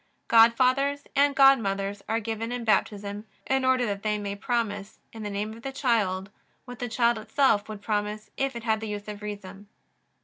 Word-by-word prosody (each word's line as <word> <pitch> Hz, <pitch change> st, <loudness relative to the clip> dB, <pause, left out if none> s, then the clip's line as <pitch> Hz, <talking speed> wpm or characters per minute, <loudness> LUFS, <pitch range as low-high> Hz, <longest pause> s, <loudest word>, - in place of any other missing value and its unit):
Godfathers 255 Hz, +5 st, +4 dB
and 280 Hz, 0 st, +3 dB
godmothers 205 Hz, -7 st, +3 dB
are 225 Hz, -, +1 dB
given 225 Hz, +1 st, -4 dB
in 245 Hz, -1 st, -3 dB
Baptism 205 Hz, -1 st, 0 dB, 0.2 s
in 265 Hz, 0 st, +1 dB
order 260 Hz, -1 st, +3 dB
that 200 Hz, -3 st, -3 dB
they 210 Hz, 0 st, 0 dB
may 200 Hz, -1 st, -4 dB
promise, 210 Hz, -2 st, -2 dB, 0.2 s
in 225 Hz, -, -8 dB
the 210 Hz, -, -4 dB
name 205 Hz, +2 st, -3 dB
of 230 Hz, -, -12 dB
the 270 Hz, -, -5 dB
child, 210 Hz, -8 st, 0 dB, 0.3 s
what 245 Hz, -2 st, -10 dB
the 245 Hz, -, -3 dB
child 235 Hz, 0 st, +2 dB
itself 220 Hz, -2 st, +2 dB
would 210 Hz, -1 st, -8 dB
promise 210 Hz, 0 st, -2 dB
if 270 Hz, -1 st, -1 dB
it 235 Hz, -, -6 dB
had 220 Hz, -2 st, +1 dB
the 220 Hz, -, -5 dB
use 205 Hz, 0 st, -5 dB
of 210 Hz, 0 st, -7 dB
reason. 205 Hz, -1 st, -8 dB
220 Hz, 190 wpm, -27 LUFS, 205-245 Hz, 0.3 s, Godfathers